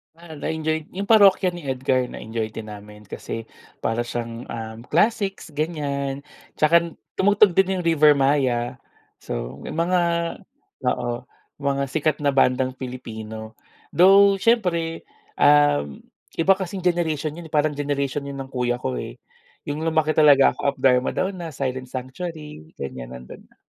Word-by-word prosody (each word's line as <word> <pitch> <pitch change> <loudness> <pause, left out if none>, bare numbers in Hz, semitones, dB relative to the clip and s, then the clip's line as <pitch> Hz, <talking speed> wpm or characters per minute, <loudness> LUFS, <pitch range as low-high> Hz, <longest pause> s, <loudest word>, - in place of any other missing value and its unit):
Ah, 165 -1 -12
na-enjoy 160 +1 -3
yung 200 +2 -4
Parokya 195 -4 +5
ni 175 - -8
Edgar 130 -1 0
na-enjoy 110 0 -4
din 110 0 -8
namin. 105 0 -11
Kasi 115 +3 -6 0.3
para 115 +1 -1
siyang, 120 0 -5
um, 110 -1 -6
classics, 200 +3 +1
ganyan. 140 -3 -2 0.4
Tsaka 170 +2 +4 0.2
tumugtog 205 -1 +4
din 190 -1 +2
yung 175 - -5
Rivermaya. 140 -6 +3 0.5
So, - - -5
yung 165 - -5
mga 180 +2 +2 0.8
oo, 120 -1 -1 0.4
mga 140 0 +1
sikat 155 +3 0
na 140 -2 0
bandang 130 0 +2
Pilipino. 110 -4 -7 0.4
Though 195 +2 +7
syempre, 180 -7 0 0.3
um, 145 - +3 0.3
iba 180 +4 +4
kasing 190 0 -5
generation 160 -3 0
yun, 170 - -9
eh, - - -23
parang 150 0 +3
generation 140 -1 -2
yun 140 - -6
ng 135 -1 -7
kuya 125 -1 0
ko, 65 -2 -2
eh. - - -7 0.5
Yung 145 +1 -4
lumaki 160 -1 +2
talaga 145 -3 +6
ako 140 0 -2
Up - - -35
Dharma 125 -1 +3
Down 185 0 -2
na 165 -5 -7
Silent 130 -2 -3
Sanctuary, 135 - -7
ganyan 65 -2 -7
nandun 60 0 -12
na. - - -29
145 Hz, 145 wpm, -23 LUFS, 125-170 Hz, 0.8 s, Though